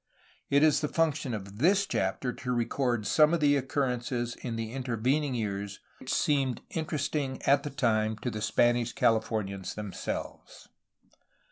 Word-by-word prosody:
It 140 +1 +4
is 155 -2 +4
the 150 - 0
function 155 -4 0
of 100 -1 -6
this 195 +7 +4
chapter 115 - -1
to 125 - -4
record 120 -1 0
some 155 +6 +4
of - - -1
the 145 -1 +4
occurrences 125 -3 -1
in 120 -3 -4
the 115 -1 -4
intervening 130 +3 0
years 100 -3 -3 0.2
which - - -5
seemed 135 -4 +1
inter 160 -1 -2
esting 140 -2 -2
at 140 +1 +5
the 145 - -5
time 110 -5 +1
to 125 - -1
the 105 - -5
Spanish 120 +2 +2
Cahfornians 110 -4 0
themselves. 105 -2 -6
125 Hz, 150 wpm, -29 LUFS, 110-140 Hz, 0.2 s, at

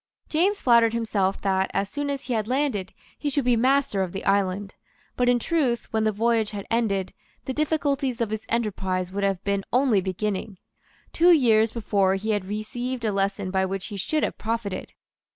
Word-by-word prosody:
James 385 +6 +2
flattered 235 -2 +4
himself 205 -4 0
that, 190 -1 +1
as 200 - +1
soon 290 +6 -3
as 280 -1 -3
he 250 - -3
had 215 -2 -1
landed, 255 -8 -1 0.3
he 295 - -1
should 285 -2 -1
be 245 -1 +4
master 255 -3 +2
of 185 -2 -2
the 195 - -5
island. 195 0 +1 0.4
But 245 0 +2
in 245 - +4
truth, 250 -4 -1
when 220 0 +1
the 215 - +3
voyage 225 0 +1
had 200 -2 -6
ended, 200 -5 0 0.3
the 260 - -3
difficulties 285 -4 0
of 230 -3 -1
his 220 0 -4
enterprise 190 -5 -1
would 200 +1 -3
have 195 -2 0
been 200 -1 0
only 250 -5 +3
beginning. 195 +1 -3 0.6
Two 345 +2 +5
years 225 -8 +5
before 200 -4 +1
he 215 +3 -2
had 205 -3 -1
received 235 +4 -4
a 215 - +1
lesson 195 -1 -1
by 190 0 +1
which 190 0 -2
he - - -4
should 305 - -1
have - - -2
profited. 220 -3 -3
220 Hz, 190 wpm, -25 LUFS, 195-250 Hz, 0.6 s, Two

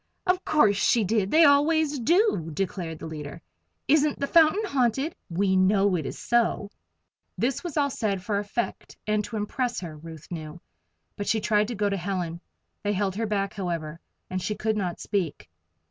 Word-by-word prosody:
"Of 365 0 +1
course 215 -10 +3
she 230 +2 +3
did 205 -1 +1
they 320 +7 +6
always 295 0 +4
do," 325 - +2
declared 170 -1 -3
the - - -8
leader. 150 -1 -7 0.5
"Isn't 300 0 +3
the 280 - 0
fountain 330 +7 +4
haunted? 270 - 0 0.2
We 190 +2 +1
know 195 +1 +3
it 155 -5 -2
is - - -6
so." 230 -3 0 0.7
This 255 +7 -1
was 340 -4 -5
all 285 -1 +2
said 200 -7 -2
for 200 +1 0
effect, 210 +3 -4
and 210 0 +1
to 225 - -5
impress 240 +4 -2
her, 165 -4 -7
Ruth 160 +1 -11
knew. 155 0 -6 0.6
But 205 - -4
she 225 - +2
tried 210 0 +2
to 240 - -4
go 205 0 +1
to 200 -1 -1
Helen. 175 -2 -3 0.4
They 205 0 0
held 190 -1 -1
her 225 +1 -1
back, 200 -2 -1
however, 170 -4 -4 0.3
and 185 0 -3
she 210 - -2
could 220 +1 -1
not 185 -4 -2
speak. 185 -8 -2
205 Hz, 180 wpm, -26 LUFS, 180-255 Hz, 0.7 s, they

